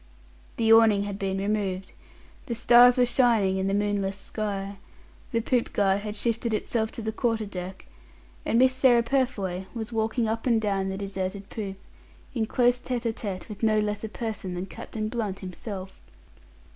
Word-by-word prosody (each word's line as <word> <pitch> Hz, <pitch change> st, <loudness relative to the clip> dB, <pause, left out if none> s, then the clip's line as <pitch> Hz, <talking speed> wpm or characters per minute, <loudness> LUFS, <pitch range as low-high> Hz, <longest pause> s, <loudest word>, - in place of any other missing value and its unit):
The 225 Hz, -1 st, +5 dB
awning 220 Hz, -3 st, +6 dB
had 200 Hz, -1 st, -5 dB
been 195 Hz, -1 st, -1 dB
removed, 195 Hz, -2 st, -2 dB, 0.6 s
the 235 Hz, -, -2 dB
stars 245 Hz, +2 st, +7 dB
were 250 Hz, -, +5 dB
shining 235 Hz, -6 st, +3 dB
in 190 Hz, 0 st, 0 dB
the 195 Hz, -, 0 dB
moonless 205 Hz, -1 st, 0 dB
sky, 200 Hz, -1 st, -4 dB, 0.5 s
the 230 Hz, -2 st, 0 dB
poop 245 Hz, +1 st, 0 dB
guard 195 Hz, -1 st, +2 dB
had 210 Hz, 0 st, -5 dB
shifted 230 Hz, +1 st, 0 dB
itself 220 Hz, +1 st, -1 dB
to 230 Hz, -, -6 dB
the 220 Hz, -, -1 dB
quarter 225 Hz, -1 st, 0 dB
deck, 185 Hz, -1 st, -7 dB, 0.6 s
and 230 Hz, -, +1 dB
Miss 260 Hz, +1 st, +5 dB
Sarah 255 Hz, -2 st, +4 dB
Purfoy 230 Hz, -8 st, -1 dB
was 230 Hz, 0 st, -5 dB
walking 225 Hz, +1 st, 0 dB
up 225 Hz, +3 st, -2 dB
and 230 Hz, -2 st, +4 dB
down 195 Hz, -3 st, 0 dB
the 190 Hz, -, -3 dB
deserted 195 Hz, 0 st, -4 dB
poop, 195 Hz, -3 st, -5 dB, 0.6 s
in 225 Hz, -3 st, -1 dB
close 245 Hz, +1 st, +3 dB
tête 245 Hz, -1 st, -3 dB
à 230 Hz, -2 st, 0 dB
tête 195 Hz, -5 st, -5 dB
with 210 Hz, -3 st, -9 dB
no 220 Hz, -1 st, +3 dB
less 210 Hz, 0 st, -1 dB
a 220 Hz, -, -3 dB
person 210 Hz, -5 st, -4 dB
than 180 Hz, +1 st, -3 dB
Captain 215 Hz, +3 st, -5 dB
Blunt 215 Hz, -4 st, -3 dB
himself. 190 Hz, +1 st, -7 dB
215 Hz, 175 wpm, -26 LUFS, 195-230 Hz, 0.6 s, stars